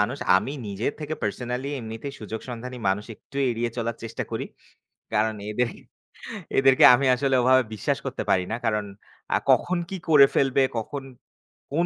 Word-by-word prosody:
মানুষ 120 +7 0 0.2
আমি 125 +8 -1 0.2
নিজে 100 +3 -2
থেকে 155 +1 -3
পার্সোনালি 125 +5 -3
এমনিতেই, 115 +5 -6
সুযোগ 110 0 -5
সন্ধানী 125 +1 -6
মানুষ 105 +2 0
একটু 140 - -15
এড়িয়ে 120 0 -1
চলার 115 0 -2
চেষ্টা 115 - -4
করি। - - -3 0.7
কারণ 110 +1 +1 0.2
এদের 125 +2 0 0.9
এদেরকে 135 -1 +6
আমি 135 +2 -1
আসলে 135 +1 +1
ওভাবে 130 +1 +5
বিশ্বাস 105 - -1
করতে - - -3
পারি 90 -1 +3
না। - - 0
কারণ 105 -2 0 0.5
আ - - +5
কখন 185 - +2
কি 195 - -4
করে 145 -3 +8
ফেলবে, 135 0 +3
কখন, 135 +5 -4 0.7
কোন 170 +4 +2
125 Hz, 160 wpm, -25 LUFS, 110-135 Hz, 0.9 s, করে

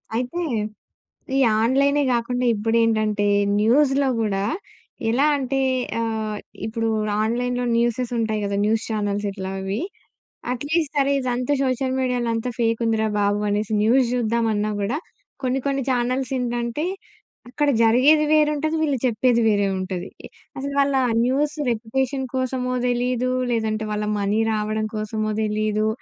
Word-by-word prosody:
అయితే 250 +9 -2 1.0
ఈ - - +3 0.2
ఆన్‌లై‌నే, 280 +4 +3
గాకుండా 245 +1 -1
ఇప్పుడేంటంటే 215 -1 +1 0.3
న్యూస్‌లో 270 +5 +3
గూడా 200 -2 0 0.6
ఎలా 255 +6 +3
అంటే 270 0 -1 0.4
ఆహ్, 220 -2 -2 0.3
ఇప్పుడు 225 +1 -2 0.4
ఆన్‌లై‌న్‌లో 245 +2 -1
న్యూసెస్ 240 +1 0
ఉంటాయి 220 -1 0
గదా! 200 0 -1
న్యూస్ 220 +1 +1
చానెల్స్ 205 -1 -1
ఇట్లా 190 -1 -5
అవి. 195 +2 -3 0.7
అట్‌లీస్ట్ 300 +4 -1
సరే, 280 0 +3
ఇదంతా 250 +1 -1
సోషల్ 260 0 0
మీడియాలో 250 -2 0
అంతా 225 +2 -2
ఫేకుందిరా 225 -1 +1
బాబు! 205 0 +1
అనేసి 210 +1 -1
న్యూస్ 250 +4 +4
జూద్దామన్నా 225 -3 0
గూడా 220 +8 -1 0.5
కొన్ని, 260 +1 0
కొన్ని 275 -1 0
చానెల్స్ 255 +2 0
ఏంటంటే, 240 +3 -2 0.6
అక్కడ 290 +4 0
జరిగేది 270 +7 +5
వేరుంటది. 305 +1 +2
వీళ్ళు 285 -3 +1
చెప్పేది 235 +1 +2
వేరే 205 -1 +2
ఉంటది. 185 -1 -4 0.2
ఈ - - -7 0.3
అసలు 280 +1 -4
వాళ్ళ 280 -1 +2 0.3
న్యూస్ 290 +4 0 0.2
రెప్యుటేషన్ 260 +4 -2
కోసమో 255 -1 -1
తెలీదు, 250 +1 0 0.2
లేదంటే 220 -2 -1
వాళ్ళ 210 0 -2
మనీ 205 +2 +1
రావడం 215 0 -1
కోసమో 215 0 -2
తెలీదు. 215 0 0
235 Hz, 125 wpm, -22 LUFS, 215-260 Hz, 1.0 s, జరిగేది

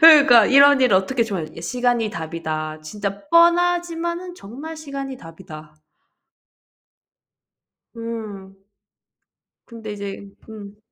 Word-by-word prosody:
그러니까 285 -9 +8
이런 280 0 +6
일을 245 -7 +4
어떻게 235 +6 0
저 195 -8 -4 0.2
시간이 245 +2 -1
답이다. 155 -2 -5
진짜 200 - -6
뻔하지만은 345 +1 +1
정말 300 - -9
시간이 275 -3 -7
답이다. 165 -5 -13 2.2
음. 215 -4 -8 1.1
근데 225 -2 -9
이제 200 -1 -7 0.2
음. 205 -2 -11
230 Hz, 215 characters per minute, -21 LUFS, 195-285 Hz, 2.2 s, 그러니까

